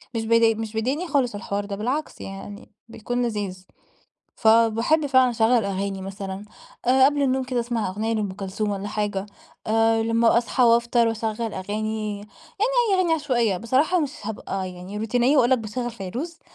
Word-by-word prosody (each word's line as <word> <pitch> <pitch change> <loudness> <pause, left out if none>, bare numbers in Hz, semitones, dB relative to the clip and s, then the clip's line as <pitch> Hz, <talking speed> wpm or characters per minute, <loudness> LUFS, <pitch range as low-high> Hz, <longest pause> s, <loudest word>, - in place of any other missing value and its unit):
مش 225 -1 -1
بي 230 0 +4
مش 220 0 -5
بيضايقني 265 +11 -1
خالص 265 -8 +1
الحوار 200 0 -3
ده 200 0 -5
بالعكس 255 +9 -3
يعني 195 +1 -9 0.2
بيكون 240 +2 -3
لذيذ. 200 -5 -4 0.7
فباحب 230 +7 +3
فعلًا 260 -2 +4
اشغل 230 -1 +2
أغاني 195 0 -3
مثلًا 195 +1 -6 0.4
آآ 260 +2 +5
قبل 290 +1 +2
النوم 265 -1 +1
كده 255 -1 -2
أسمع 235 -3 -2
أغنية 215 +4 -2
لأم 210 -3 -1
كلثوم 195 +2 -3
والّا 200 0 -4
حاجة، 205 -2 -2 0.4
آآ 225 0 +3
لما 230 +1 +3
أصحى 235 +2 +1
وأفطر 235 0 +4
وأشغل 225 0 -2
أغاني 215 +2 -3
يعني 205 +1 -12 0.6
أي - - +4
أغاني 360 -3 +2
عشوائية، 245 - +1
بصراحة 265 - +2
مش 290 -4 -1
هابقى 195 -3 -4
يعني 180 +3 -8
روتينية 245 +5 +2
وأقول 245 -2 +4
لَك 260 - +4
باشغل 240 +2 -4
فيروز 240 - -6
225 Hz, 165 wpm, -24 LUFS, 205-245 Hz, 0.7 s, آآ